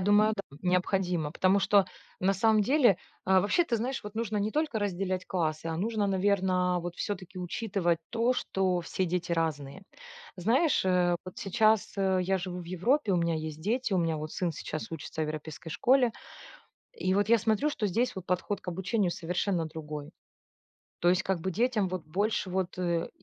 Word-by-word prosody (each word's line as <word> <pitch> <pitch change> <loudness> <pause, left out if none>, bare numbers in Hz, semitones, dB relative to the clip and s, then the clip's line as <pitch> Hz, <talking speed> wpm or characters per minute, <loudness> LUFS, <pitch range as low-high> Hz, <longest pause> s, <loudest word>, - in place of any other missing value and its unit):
думаю, 205 +3 +4
да. 180 -8 -8
Необходимо. 180 -3 +1
Потому 185 +4 +3
что 200 0 +4 0.4
на 190 +1 +3
самом 215 +2 +4
деле 255 - +4 0.3
А 190 0 +5
вообще, 210 - +2
ты 240 -8 0
знаешь, 255 +4 -3
вот 210 0 -8
нужно 220 -2 -2
не 205 +1 0
только 300 -3 0
разделять 185 -2 -2
классы, 160 -3 -1
а 165 -1 -2
нужно, 210 +3 0
наверное, 185 -2 +2
вот 175 0 -5
всё-таки 185 -2 -5
учитывать 180 -1 -1
то, 235 +2 +2
что 190 -7 0
все 185 - -2
дети 180 0 -2
разные. 160 -1 -2 0.5
Знаешь, 240 - +2
э, 180 -1 +3
вот 185 - -9
сейчас, 215 +2 +2
э, 190 -1 +2
я 190 +1 +1
живу 180 0 -5
в - - -9
Европе, 205 - +1
у - - +3
меня 170 -1 +1
есть 155 -1 -5
дети, 225 +4 -1
у - - +3
меня 165 -2 +1
вот 155 0 -5
сын 175 -3 -1
сейчас 155 +1 -6
учится 160 0 -4
в - - +1
европейской 155 +1 -6
школе, 250 - +3 0.8
и 185 - -1
вот 205 +1 +2
я 235 - +7
смотрю, 220 +7 +1
что 225 -8 -1
здесь 230 +6 0
вот 185 - -5
подход 180 +3 -1
к - - -10
обучению 190 +2 0
совершенно 175 0 -1
другой. 150 -2 -7 0.9
То 175 - +3
есть 180 +1 +3
как 190 -2 0
бы 190 +3 -2
детям 225 -1 +1
вот 185 -2 -4
больше 200 +3 0
вот, 185 -1 -2
э, 170 -2 0
185 Hz, 185 wpm, -29 LUFS, 175-210 Hz, 0.9 s, я